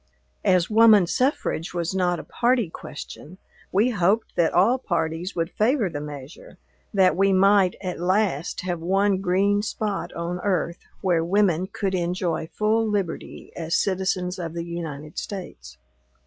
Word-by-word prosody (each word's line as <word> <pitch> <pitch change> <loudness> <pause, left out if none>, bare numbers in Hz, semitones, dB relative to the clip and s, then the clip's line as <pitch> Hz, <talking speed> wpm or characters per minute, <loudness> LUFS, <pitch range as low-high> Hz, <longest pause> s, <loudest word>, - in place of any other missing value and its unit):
As 180 -2 +3
woman 215 -3 +6
suffrage 180 - -1
was 170 +1 -1
not 180 -2 +1
a - - -7
party 240 -7 +1
question, 155 +3 -9 0.3
we 215 +6 +3
hoped 200 +2 +1
that 170 -2 +2
all 230 +9 +3
parties 165 -3 -2
would 165 -1 -1
favor 220 - +1
the 145 -2 -4
measure; 145 0 -10 0.3
that 190 -3 +4
we 195 +2 +3
might, 195 -1 +4
at 180 -2 -4
last, 185 -3 0
have 180 -2 -3
one 195 +3 +2
green 200 +2 +2
spot 205 -4 -3
on 170 +1 -4
earth 180 -3 -1 0.2
where 175 -4 +2
women 185 -1 +2
could 195 0 -3
enjoy 175 -2 -1
full 215 +5 +1
liberty 195 -5 -4
as 165 -1 -2
citizens 185 -1 -1
of 165 -1 -5
the 170 0 -3
United 155 -3 -6
States. 60 - -8
185 Hz, 150 wpm, -24 LUFS, 170-200 Hz, 0.3 s, woman